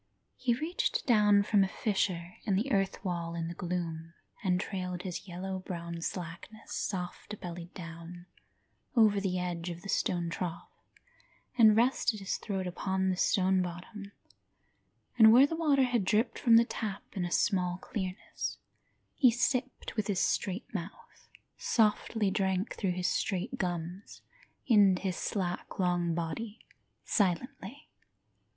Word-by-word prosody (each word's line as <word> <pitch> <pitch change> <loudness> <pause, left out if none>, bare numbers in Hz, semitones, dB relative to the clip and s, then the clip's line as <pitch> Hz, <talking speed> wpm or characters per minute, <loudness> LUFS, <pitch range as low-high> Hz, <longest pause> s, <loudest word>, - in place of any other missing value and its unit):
He 250 -2 +1
reached 315 +8 -1
down 210 -4 +5
from 205 -1 +4
a - - +1
fissure 185 -4 -1
in 200 -3 +2
the 225 +8 0
earth 195 0 0
wall 170 -2 -2
in 165 -1 -2
the 170 - -4
gloom 170 -2 -4 0.3
And 180 -2 +2
trailed 180 -3 -4
his 185 +1 -5
yellow 190 +2 -4
brown 170 -2 -6
slackness 175 +5 -6
soft 190 +2 -4
bellied 175 0 -7
down, 170 0 -9 0.7
over 215 -4 +5
the 185 -2 -1
edge 175 -1 -3
of 170 0 -7
the 200 - -8
stone 170 -3 0
trough 170 -1 -5 0.8
And 220 -3 +7
rested 235 -1 +2
his 195 -1 -2
throat 195 -3 -3
upon 190 +1 -1
the - - 0
stone 190 0 +3
bottom, 180 +3 -6 1.1
And 220 -1 +10
where 250 +4 +8
the 325 - -2
water 295 -5 +3
had 245 -4 +1
dripped 225 +4 +1
from 230 -2 +5
the 230 +1 +7
tap, 210 -4 -4
in 190 - -3
a 175 - -2
small 180 -1 +1
clearness, 190 0 -5 0.6
He 260 - +5
sipped 255 +2 -1
with 215 -3 -1
his 200 -3 0
straight 195 +4 0
mouth, 190 -1 -8 0.3
Softly 220 - +2
drank 190 0 0
through 190 -4 -1
his 180 0 -1
straight 195 +7 -1
gums, 175 +1 -4 0.4
into 200 -5 +5
his 185 -2 -1
slack 180 -2 -3
long 175 -2 +1
body, 200 +7 -4 0.4
Silently. 205 - -1
190 Hz, 145 wpm, -31 LUFS, 175-215 Hz, 1.1 s, And